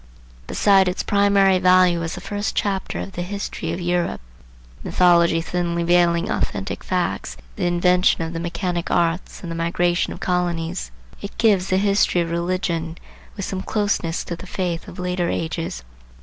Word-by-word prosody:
Beside 195 -2 +4
its 180 - -1
primary 200 -2 +4
value 180 -1 +4
as 165 -1 -3
the 180 - -8
first 205 +2 -3
chapter 195 -2 -1
of 195 - -6
the 175 - -5
history 200 +3 -4
of - - -3
Europe, 175 0 -1 0.6
(the - - -6
mythology 170 -2 +4
thinly 170 0 -1
veiling 170 0 +3
authentic - - -3
facts, 60 - -2 0.2
the - - -1
invention 180 0 +3
of 165 +1 -5
the 165 - -3
mechanic 175 0 -3
arts 170 +2 0
and 170 - -5
the - - -3
migration 175 +1 0
of - - -7
colonies,) 170 - -1 0.3
it 200 - -8
gives 205 -5 +3
the 185 - +2
history 200 -2 +2
of 165 -1 -3
religion, 170 -1 -2 0.4
with 195 - -3
some 190 -1 -4
closeness 205 -6 -1
to 170 - -5
the 185 - -11
faith 180 -2 -3
of - - -10
later 180 -1 -1
ages. 165 - -3
175 Hz, 165 wpm, -22 LUFS, 170-190 Hz, 0.6 s, Beside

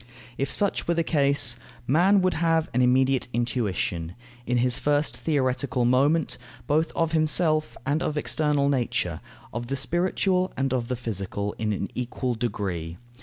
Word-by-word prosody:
If 135 +1 -2
such 200 -1 +2
were 170 - +2
the 165 - +1
case, 140 -7 +2 0.3
man 180 +9 +4
would 185 - +2
have 165 -1 +1
an 125 - +2
immediate 130 +1 +3
intuition, 105 -7 -2 0.3
in 125 - +1
his 125 0 +2
first 145 +1 0
theoretical 130 -4 0
moment, 140 +6 +2 0.3
both 155 +4 +1
of 165 -1 +1
himself 155 0 +2
and 145 +4 0
of 150 - -2
external 150 -2 +1
nature, 130 -4 -1 0.3
of 120 +1 -4
the 135 - -2
spiritual 180 +5 0
and 135 0 0
of 120 -2 -1
the 125 - -2
physical, 100 -3 -4
in 110 -1 0
an 100 - -3
equal 125 0 -2
degree. 95 -8 -3
135 Hz, 155 wpm, -25 LUFS, 120-155 Hz, 0.3 s, man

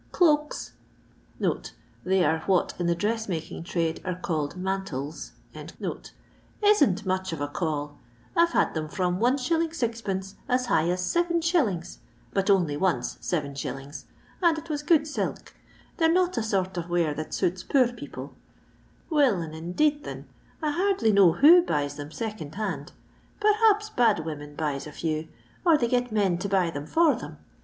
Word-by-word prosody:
Ctoait 300 -4 +2 1.3
(they 185 -1 +2
are 160 - +2
what 190 -3 +2
in 175 - 0
the 170 - +2
dress 220 +4 -1
making 165 -3 -4
trade 165 -1 -1
are 185 -1 -2
callel 165 -3 -3
mantles) 180 -6 -4 1.3
isn't 285 - +4
much 185 0 -1
of 165 - -4
a 145 - -1
call. 145 -1 -3 0.4
I 335 - +6
've 335 - -12
had - - +2
them 155 -1 -3
from 180 0 0
Is. 255 +3 +3
6d. 235 - -1 0.2
as 250 0 +2
high 165 -8 +2
as 180 +1 0
7s. 335 - 0 0.2
— - - -31
but 195 +1 0
only 175 -7 +3
once 185 +3 0
7s., 140 -3 -4 0.4
and 340 -3 +4
it 320 +1 -6
was 295 -1 -2
good 305 0 +3
silk. 300 - -4 0.4
They 325 - +4
re 325 - +3
not 365 0 +2
a - - 0
sort 190 -4 -1
of 175 0 -4
wear 170 -3 +1
that 155 +1 -6
suits 185 +1 0
poor 255 -3 +2
people. 240 - -8 0.8
Will 285 -8 +4
and 160 -2 -5
indeed 285 - 0
thin, - - -7 0.4
I 300 - +1
hardly 370 - +2
know 195 -5 +6
who 330 - +8
buys 145 - -2
theni 145 +1 -7
second 210 -10 -5
hand. 185 -10 -3 0.5
Perhaps 425 0 +3
bad 220 -9 +2
women 145 -2 -6
buys 145 -2 -2
a - - -8
few, 155 +1 -3 0.4
or 335 -4 +5
they 240 - +1
get 245 0 0
men 195 -5 +1
to 200 - -3
buy 185 -4 +2
them 145 -1 -6
for 325 - +4
them. - - -8
190 Hz, 165 wpm, -26 LUFS, -, 1.3 s, who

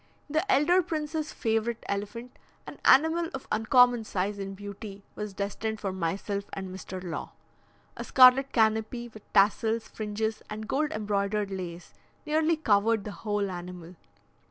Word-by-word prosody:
The 315 +7 0
elder 350 +6 +4
prince's 310 -1 -3
favourite 225 +1 -1
elephant, 210 +5 -4 0.3
an - - -10
animal 320 +4 +5
of 265 - -8
uncommon 240 +2 +4
size 200 0 -2
and 195 0 -5
beauty, 200 0 -9
was 210 -2 -6
destined 215 +2 -3
for 195 -2 -3
myself 195 +3 -2
and 190 -1 -5
Mr. 185 0 -7
Law. 170 -3 -5 0.6
A - - -5
scarlet 265 +1 +6
canopy, 220 +1 +1
with 215 -2 -16
tassels, 220 +3 +3
fringes, 215 0 -3
and 215 0 -6
gold 295 +4 0
embroidered 205 -1 -1
lace, 180 -2 -6 0.3
nearly 315 +1 +2
covered 220 -5 +2
the 210 - -6
whole 205 -2 -2
animal. 175 -1 -8
215 Hz, 140 wpm, -28 LUFS, 200-250 Hz, 0.6 s, scarlet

